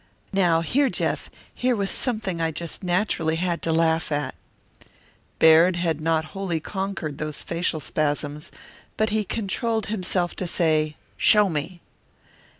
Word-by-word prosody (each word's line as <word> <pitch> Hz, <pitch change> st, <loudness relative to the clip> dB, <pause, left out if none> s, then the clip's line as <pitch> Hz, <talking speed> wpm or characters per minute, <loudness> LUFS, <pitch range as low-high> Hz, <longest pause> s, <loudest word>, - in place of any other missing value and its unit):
"Now, 175 Hz, -4 st, +3 dB
here, 270 Hz, -, +2 dB
Jeff, -, -, -2 dB, 0.2 s
here 250 Hz, 0 st, +1 dB
was 200 Hz, -2 st, 0 dB
something 215 Hz, -9 st, -1 dB
I 165 Hz, -, +1 dB
just 160 Hz, +1 st, -5 dB
naturally 175 Hz, -3 st, 0 dB
had 170 Hz, 0 st, -1 dB
to 165 Hz, -, 0 dB
laugh 160 Hz, 0 st, +2 dB
at." 145 Hz, -2 st, -1 dB, 1.0 s
Baird 165 Hz, +3 st, +6 dB
had 165 Hz, -3 st, -1 dB
not 160 Hz, 0 st, +1 dB
wholly 190 Hz, -5 st, -2 dB
conquered 190 Hz, -5 st, -4 dB
those 155 Hz, -1 st, -4 dB
facial 170 Hz, -1 st, -1 dB
spasms, 145 Hz, 0 st, -2 dB, 0.5 s
but 215 Hz, 0 st, +1 dB
he 215 Hz, 0 st, +1 dB
controlled 220 Hz, +2 st, -2 dB
himself 180 Hz, -3 st, -1 dB
to 185 Hz, -, -2 dB
say, 155 Hz, -3 st, +1 dB, 0.2 s
"Show 210 Hz, -2 st, +5 dB
me!" 165 Hz, +3 st, -4 dB
170 Hz, 140 wpm, -24 LUFS, 160-195 Hz, 1.0 s, Baird